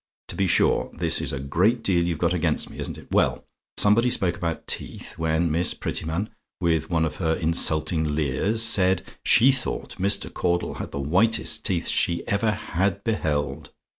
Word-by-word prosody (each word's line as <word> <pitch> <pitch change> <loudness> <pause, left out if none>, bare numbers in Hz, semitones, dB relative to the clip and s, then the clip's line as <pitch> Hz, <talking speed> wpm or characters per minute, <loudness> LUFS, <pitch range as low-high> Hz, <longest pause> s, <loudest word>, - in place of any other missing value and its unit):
To - - -5
be 95 - 0
sure, - - +2
this - - 0
is - - 0
a 70 - -4
great 95 - +1
deal 90 -3 +2
you've 85 -2 -2
got 85 +2 +1
against 90 - -1
me, - - -11
isn't - - -4
it? - - -15
Well, - - +1 0.3
somebody 115 +4 +3
spoke 90 -7 0
about 85 -2 -4
teeth, - - -3
when 80 +1 0
Miss 85 +3 +2
Prettyman, 80 +7 -3 0.3
with 80 -2 0
one 80 -2 +1
of 80 - -5
her 80 -3 0
insulting 80 -2 +1
leers, 80 - +1
said 95 -4 +3 0.2
'she 130 +4 +5
thought 130 -1 -4
Mr. 100 +2 +1
Caudle 85 0 -1
had - - -6
the 70 - -6
whitest 110 +9 +2
teeth 90 -4 -1
she 85 - 0
ever 100 +2 +1
HAD 100 -1 -2
beheld.' 75 - -2
85 Hz, 175 wpm, -24 LUFS, 80-100 Hz, 0.3 s, she